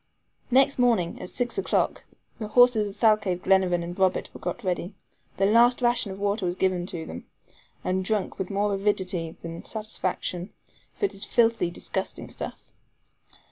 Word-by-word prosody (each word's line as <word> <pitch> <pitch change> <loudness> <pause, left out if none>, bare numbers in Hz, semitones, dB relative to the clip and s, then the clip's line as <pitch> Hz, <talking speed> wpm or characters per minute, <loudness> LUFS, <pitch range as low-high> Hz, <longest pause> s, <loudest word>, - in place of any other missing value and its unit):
Next 265 +1 +4
morning, 230 -9 +2
at - - -6
six 245 +9 -2
o'clock, - - 0 0.3
the 215 - -4
horses 235 -2 +5
of 195 - -12
Thalcave, 210 -5 +2
Glenarvan 185 -2 +3
and 175 +2 -6
Robert 190 -1 +1
were - - -10
got 240 - -4
ready. 185 +1 -2 0.4
Their 195 +1 +3
last 240 +2 +5
ration 240 -4 +2
of 190 - -7
water 205 +1 -1
was 175 0 -1
given 185 -2 0
them, 160 - -7 0.6
and 185 +1 0
drunk 205 0 -1
with 190 - -3
more 205 0 0
avidity 190 -4 -1
than 165 0 -7
satisfaction, 190 -4 -3 0.4
for - - 0
it - - -1
was 195 - -1
filthy, 230 -4 +2
disgusting 190 +2 -4
stuff. - - -8
195 Hz, 160 wpm, -26 LUFS, 180-225 Hz, 0.6 s, horses